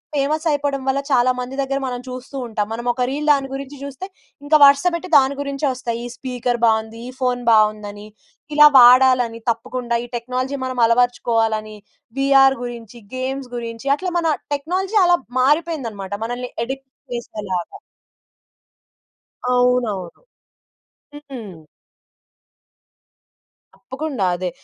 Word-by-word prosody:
Famous 300 +3 0
అయిపోవడం 285 -1 -1
వల్ల 270 +1 +1
చాలా 250 0 +4
మంది 250 +2 -6
దగ్గర 275 0 -2
మనం 245 -1 -4
చూస్తూ 255 +2 -8
ఉంటాం. 210 -2 -2
మనం 240 +2 -5
ఒక 250 - -5
రీల్ 300 +2 -2
దాని 275 -1 -1
గురించి 275 +1 -7
జూస్తే 280 +6 -7 0.4
ఇంకా 305 +1 +5
వరుస 280 +4 +5
పెట్టి 340 +2 -4
దాని 275 0 +3
గురించే 280 +1 -3
ఒస్తాయి. 235 -2 -4
ఈ - - -4
స్పీకర్ 245 -2 -3
బావుంది, 220 0 0
ఈ - - -7
ఫోన్ 250 -1 0
బావుందని 215 -1 +2 0.6
ఇలా 300 0 +8
వాడాలని, 250 -2 +6
తప్పకుండా 235 +1 -2
ఈ - - -6
టెక్నాలజీ 255 +3 -3
మనం 255 -1 -4
అలవరచుకోవాలని, 225 -2 +1 0.4
వీఆర్ 270 0 +5
గురించి, 240 -1 -8 0.2
గేమ్స్ 260 0 -4
గురించి 230 +2 -6
అట్ల 365 +4 -4
మన 335 -1 0 0.3
టెక్నాలజీ 370 +8 -1
అలా 350 0 +5 0.2
మారిపోయిందనమాట. 260 - 0
మనల్ని 245 +1 -5
అడిక్ట్ 265 +2 -6 0.3
చేసేలాగా. 210 - -5 1.8
అవునవును. 245 -8 +1 1.1
హ్మ్. 290 - -9
హ్మ్. 195 -9 -9 2.1
తప్పకుండా 265 -6 -4
అదే. 180 0 -3
250 Hz, 125 wpm, -20 LUFS, 230-275 Hz, 2.1 s, ఇలా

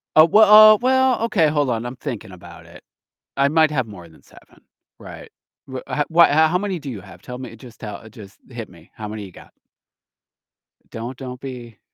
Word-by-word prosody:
Uh, 155 +1 +7
we 215 - +6
uh, 215 0 +8
well, 260 -1 +2
okay, 195 -9 +2
hold 145 -3 0
on, 115 0 -2
I'm 120 +2 -6
thinking 110 -5 -7
about 90 -1 -14
it, - - -16 0.5
I 140 0 +2
might 155 0 +3
have 130 -5 -1
more 90 -5 -12
than 80 - -21
7, - - -21 0.4
right. - - -11 0.4
Wha 130 -1 -6
h 145 - -1
w 170 +1 +6
how 160 +3 +3
many 195 -3 -3
do 140 -2 -7
you 105 -5 -7
have? - - -15
Tell 125 0 -9
me, 130 -3 -9
just 120 0 -15
tell 105 -2 -8
just 105 -3 -15
hit 115 -3 -8
me. 85 -2 -19
How 105 - -8
many 105 -1 -7
you 95 - -11
got? - - -16 1.4
Don't 120 +3 -7
don't 125 -2 -8
be 125 -5 -10
130 Hz, 200 wpm, -20 LUFS, 110-160 Hz, 1.4 s, uh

